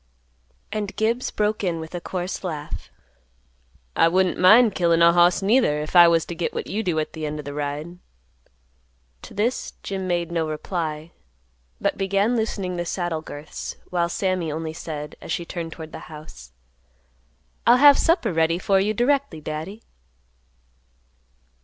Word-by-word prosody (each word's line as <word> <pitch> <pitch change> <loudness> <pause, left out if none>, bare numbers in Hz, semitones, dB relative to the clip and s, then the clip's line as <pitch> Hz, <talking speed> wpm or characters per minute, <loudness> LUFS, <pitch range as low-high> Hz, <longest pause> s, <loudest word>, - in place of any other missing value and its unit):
And 205 -1 -3
Gibbs 230 +3 0
broke 210 0 -1
in 170 -3 -1
with 160 +1 -8
a 175 - -4
coarse 180 +2 -4
laugh, 155 -5 -5 1.1
"I - - +5
wouldn't 185 +1 +1
mind 215 +4 +7
killin' 170 -2 +3
a 170 0 +7
hoss 175 +2 +4
neither, 200 - +3
if 150 +4 -6
I 175 -1 +9
was 165 -1 +3
t' - - -6
git 170 0 -3
what - - -3
you 215 - -2
do 180 -6 -1
at 155 - -2
th' - - -10
end 150 -1 -3
o' - - -6
th' 145 0 -6
ride." 150 +4 -4 1.2
To - - -12
this, 230 +5 -1
Jim 190 -1 -4
made 175 -1 -1
no 165 -2 0
reply; 155 0 -4 0.7
but - - -1
began 200 +4 +1
loosening 200 -5 -2
the 175 - -2
saddle 175 -4 -2
girths, 145 0 -7 0.2
while 170 -1 +1
Sammy 185 -3 -1
only 160 +1 -4
said, 150 -2 -7
as - - -7
she 170 - -2
turned 165 -1 -5
toward 160 -1 -9
the - - -8
house, 150 - -11 1.2
"I'll 240 - +7
have 285 +1 +7
supper 325 - +2
ready 165 +1 +2
for 195 +1 +2
you 210 +3 0
directly, 260 - +1
Daddy." 155 +8 -6
175 Hz, 165 wpm, -23 LUFS, 160-200 Hz, 1.2 s, I